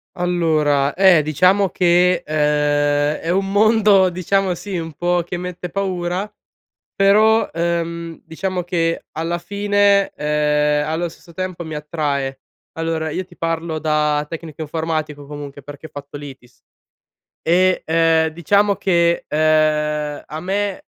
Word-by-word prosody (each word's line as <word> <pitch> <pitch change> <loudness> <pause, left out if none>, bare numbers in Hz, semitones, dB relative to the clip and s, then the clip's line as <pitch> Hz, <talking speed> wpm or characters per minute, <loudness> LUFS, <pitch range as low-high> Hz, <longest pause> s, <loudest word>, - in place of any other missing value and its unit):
Allora, 155 -5 +1
eh, 185 -4 +5
diciamo 185 +6 +3
che, 180 0 +3
uhm, 155 - -5
è 150 +1 +1
un 195 +2 +1
mondo 205 -2 +4
diciamo, 185 +1 0
sì, 195 +1 -5
un 165 -1 -5
po' 175 +3 0
che 175 +1 -5
mette 180 0 -6
paura 185 0 -2 0.7
però, 215 +3 +4
ehm, 170 0 -3
diciamo 185 +2 -3
che 165 -2 -1
alla 165 +2 -2
fine, 200 +1 +2
uhm, 150 0 +1
allo 165 +2 -1
stesso 170 +1 -16
tempo 185 0 -5
mi 160 -1 -6
attrae. 145 -3 -3 0.3
Allora, 165 -1 -2
io 185 +4 -3
ti 175 -1 -19
parlo 165 -1 -2
da 150 -1 +1
tecnico 165 -1 -8
informatico 155 -2 -3
comunque 145 -1 -9
perché 145 +3 -10
ho - - -17
fatto 145 0 -9
l'ITIS, 135 -4 -12 0.8
e, 185 +2 +2
uhm, 165 0 +3
diciamo 200 +6 +2
che, 170 -3 +1
uhm, 150 -1 +1
a 155 - -6
me 195 +2 -2
165 Hz, 130 wpm, -19 LUFS, 150-185 Hz, 0.8 s, eh